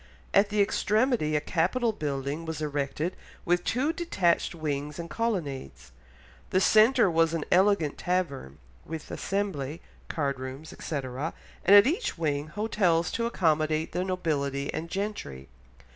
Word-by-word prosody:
At 200 +1 +5
the 210 -1 +3
extremity 215 - +1
a - - +3
capital 220 +10 +1
building 145 -2 -3
was 160 -2 -4
erected 150 +3 -2 0.3
with 175 +1 +2
two 265 - 0
detached 190 - +1
wings, 150 -2 -3
and 170 - -5
colonnades. 140 - -3 0.6
The 185 - +3
centre 220 +4 +5
was 165 0 +3
an 160 - -2
elegant 185 -5 +3
tavern, 150 - -2 0.3
with 160 -1 -7
assembly, 170 -7 -2 0.3
card 140 -4 -2
rooms, 130 +4 -7
etc., 140 +1 -4 0.3
and 200 - +7
at 205 - +9
each 345 - -1
wing, 150 -2 -1
hotels 170 -2 +1
to 230 0 -1
accommodate 155 -6 +1
the 180 - -1
nobility 145 -7 -1
and 165 +1 -4
gentry. 170 - -4
165 Hz, 135 wpm, -28 LUFS, 145-200 Hz, 0.6 s, at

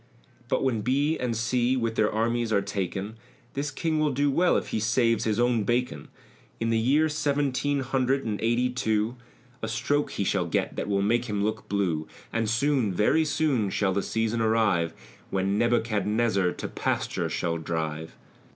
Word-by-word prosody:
But - - +1
when 120 -5 +1
B. 140 +7 +1
and 120 -3 -1
C. 120 +2 +1
with 115 -2 -1
their 110 -2 +2
armies 115 +1 0
are 100 -2 +2
taken 100 +3 -4 0.4
This 140 +2 -2
King 155 +2 -1
will 155 -1 +2
do 140 +2 +1
well 175 +5 +3
if - - -3
he - - -1
saves 115 +2 +2
his 110 0 0
own 120 -2 +2
bacon: 120 - -1 0.5
In 115 0 0
the 115 - +2
year 140 +7 +3
Seventeen 145 -2 0
hundred 135 +1 0
and 105 -2 -2
eighty 120 +2 +2
and 125 0 -2
two 110 0 0 0.5
A 110 - -2
stroke 145 +6 0
he - - -1
shall - - 0
get, - - -1
that - - -3
will 100 -1 +1
make 120 +4 +2
him 105 -3 -1
look 110 +1 -3
blue; 85 -6 0 0.3
And 115 -1 0
soon, 125 -2 +1
very 105 - +2
soon, 145 -8 +1
shall 95 -1 0
the 100 - +1
season 115 +2 -1
arrive, 105 -7 +2 0.3
When 95 +2 0
Nebuchadnezzar 110 -4 +1
to - - -5
pasture - - -2
shall 85 -1 -1
drive. 80 0 -4
115 Hz, 180 wpm, -27 LUFS, 105-130 Hz, 0.5 s, well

